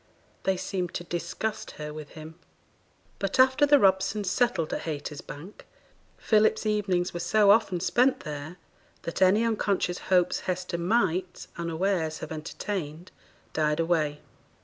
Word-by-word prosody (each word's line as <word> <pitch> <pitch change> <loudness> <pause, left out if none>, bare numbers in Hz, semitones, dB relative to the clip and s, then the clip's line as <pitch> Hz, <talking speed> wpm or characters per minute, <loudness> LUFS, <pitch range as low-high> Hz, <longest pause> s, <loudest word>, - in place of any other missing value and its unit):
They 190 -1 +2
seemed 180 -2 -3
to 175 - -3
disgust 175 +5 -4
her 150 0 -6
with 155 -1 -9
him. 155 +1 -9 0.9
But 195 +4 -2
after 260 +3 +5
the 290 0 +7
Robsons 195 -2 +2
settled 195 -9 +1
at - - -2
Haytersbank, 150 +3 -7 0.5
Philip's 220 0 +2
evenings 195 -4 0
were 175 - -4
so 205 +3 +4
often 195 -4 +3
spent 250 +9 +2
there 150 +3 -7 0.5
that 170 - -5
any 200 +5 +5
unconscious 200 -5 0
hopes 180 -2 +3
Hester 180 -1 -2
might, 185 -2 0
unawares, 170 -1 -1
have - - -8
entertained, 160 +1 -5 0.4
died 150 0 +1
away. 155 -3 0
180 Hz, 130 wpm, -27 LUFS, 160-205 Hz, 0.9 s, the